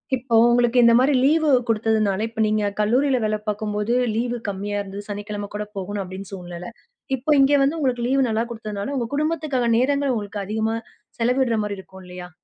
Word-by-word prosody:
இப்போ 245 -2 -2
உங்களுக்கு 240 0 +3
இந்த 235 0 +6
மாரி 275 +3 +3
லீவு 310 +2 +3 0.2
கொடுத்ததுனால, 220 -3 +1
இப்ப 225 -1 -3
நீங்க 210 -1 +1
கல்லூரியில 255 +5 +2
வேல 215 0 0
பாக்கும்போது 210 +2 -1 0.2
லீவு 240 +1 -1
கம்மியா 205 +1 -3
இருந்தது. 200 +1 -7
சனிக்கிழமை 205 0 -5
கூட 210 0 -3
போகணும் 200 +1 -3
அப்டின்னு 190 +1 -9
சூழ்நிலை. 180 +1 -8 0.5
இப்போ 270 +5 -2
இங்க 275 +1 +5
வந்து 295 +4 +1
உங்களுக்கு 245 -4 0
லீவு 270 +1 +2
நல்லா 225 +2 0
குடுத்தனால, 215 +2 -5
உங்க 235 -2 -1
குடும்பத்துக்கான 295 -6 0
நேரங்கள் 280 +1 +1
உங்களுக்கு 205 -1 -4
அதிகமா, 220 +2 -1 0.4
செலவிடுற 245 -1 +2
மாதிரி 205 -1 -4
இருக்கும் 190 0 -13
இல்லையா? 180 0 -9
220 Hz, 170 wpm, -22 LUFS, 205-255 Hz, 0.5 s, இந்த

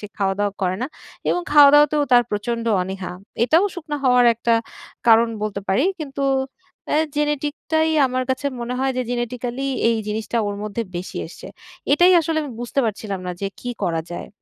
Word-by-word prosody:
সে 210 - -6
খাওয়া-দাওয়া 200 +1 0
করে 185 0 0
না। 255 - 0 0.4
এবং 355 - +1
খাওয়া-দাওয়াতেও 295 0 +7
তার 245 0 +7
প্রচণ্ড 230 +3 -2 0.2
অনীহা। 190 0 -5 0.3
এটাও 325 - +4
শুকনা 305 -4 -5
হওয়ার 250 -1 +5
একটা 230 0 +1 0.5
কারণ 230 +1 +6
বলতে 205 -2 -2
পারি। 195 +9 +2 0.2
কিন্তু 275 -2 -3 0.7
অ্যা 300 - +3 0.2
genetic 295 0 0 0.2
টাই 315 0 +3 0.2
আমার 255 0 -1
কাছে 260 +2 -1
মনে 240 +1 -3
হয় 265 0 +1
যে 255 - +1
genetically 245 +2 -3 0.2
এই 230 - +2
জিনিসটা 220 +2 -2
ওর 205 0 -3
মধ্যে 215 +2 -3
বেশি 180 +2 -6
এসছে। - - -11 0.5
এটাই 355 +5 +6
আসলে 325 0 -1
আমি 290 - -6
বুঝতে 245 +3 -1
পারছিলাম 210 -3 -3
না 180 - -2
যে 195 - -1
কী 245 - -4
করা 165 -2 0
যায়? - - -6
245 Hz, 175 wpm, -21 LUFS, 210-290 Hz, 0.7 s, খাওয়া-দাওয়াতেও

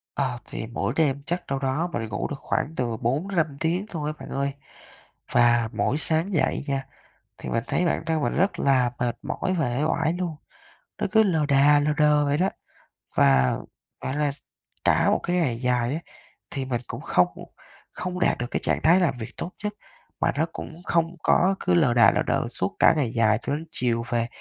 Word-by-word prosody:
Ờ, 130 -3 -1
thì 110 - -6
mỗi 120 0 -2
đêm 140 -3 +1
chắc 175 +3 -2
đâu 135 0 -1
đó 135 +6 -1
mình 115 - -2
ngủ 105 - -2
được 145 - -5
khoảng 155 - -2
từ 120 -4 -2
4-5 155 - -1
tiếng 175 +4 0
thôi 155 -3 -3
bạn - - -9
ơi. 140 0 -1 0.8
Và 120 -1 +4
mỗi 145 - 0
sáng 160 +5 0
dậy 160 - +1
nha, 135 -1 -2 0.5
thì - - -7
mình 115 - -1
thấy 180 - 0
bản - - 0
thân 160 -2 0
mình 120 - 0
rất 195 +4 +1
là 130 -3 +3
mệt 120 -1 -1
mỏi 185 - -2
và 125 -6 0
uể 140 - 0
oải 160 0 +1
luôn, 175 -3 -3 0.6
nó - - -1
cứ 220 0 +6
lờ 160 -7 +1
đà 145 +1 +5
lờ 150 +1 +1
đờ 150 -1 +4
vậy 145 0 +1
đó. 185 +4 +2 0.7
Và, 65 -2 +4 0.4
gọi 130 - -3
là, 150 -1 +1
s 140 - -9 0.4
cả - - +3
một - - +2
cái 175 - 0
ngày 135 -10 +1
dài 125 0 +1
á, - - -2 0.5
thì 135 -1 -3
mình 120 -2 -2
cũng - - -6
không - - +3 0.7
không 180 0 -4
đạt - - +2
được 120 - -3
cái - - 0
trạng - - 0
thái 170 +4 +6
làm 170 -8 +1
việc 110 -2 -6
tốt 175 - -5
nhất, 210 0 -2 0.5
mà - - +3
nó 160 - +3
cũng 165 +2 -8
không 170 +1 +1
có 190 +2 +4
cứ 180 - +1
lờ 150 -8 +4
đà 115 -3 +6
lờ - - 0
đờ - - +1
suốt 95 0 -3
cả - - +6
ngày 130 -6 0
dài 110 -2 +3
cho 140 - -2
đến 160 +2 -6
chiều 120 -6 0
về. 115 -1 0
145 Hz, 210 wpm, -25 LUFS, 120-165 Hz, 0.8 s, cứ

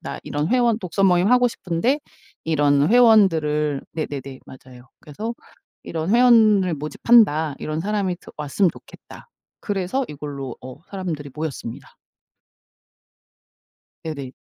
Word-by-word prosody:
"나 - - -7
이런 150 +3 -2
회원 240 -3 +2
독서모임 185 -1 +2
하고 250 0 +4
싶은데 230 - -1 0.4
이런 145 -2 +2
회원들을" 165 - +3
네네네 140 -4 -6
맞아요 130 -1 -15
"그래서 215 +11 -6 0.5
이런 160 0 -4
회원을 220 -7 +5
모집한다. 155 -1 +2
이런 155 +1 -4
사람이 195 -1 -1
드 - - -14
왔으면 150 +5 +1
좋겠다." - - -15 0.3
그래서 205 +5 -2
이걸로 140 -3 -7
어 130 0 -10
사람들이 175 -7 -5
모였습니다. 150 -7 -6 2.2
네네. 140 -5 -6
165 Hz, 280 characters per minute, -22 LUFS, 145-210 Hz, 2.2 s, 회원을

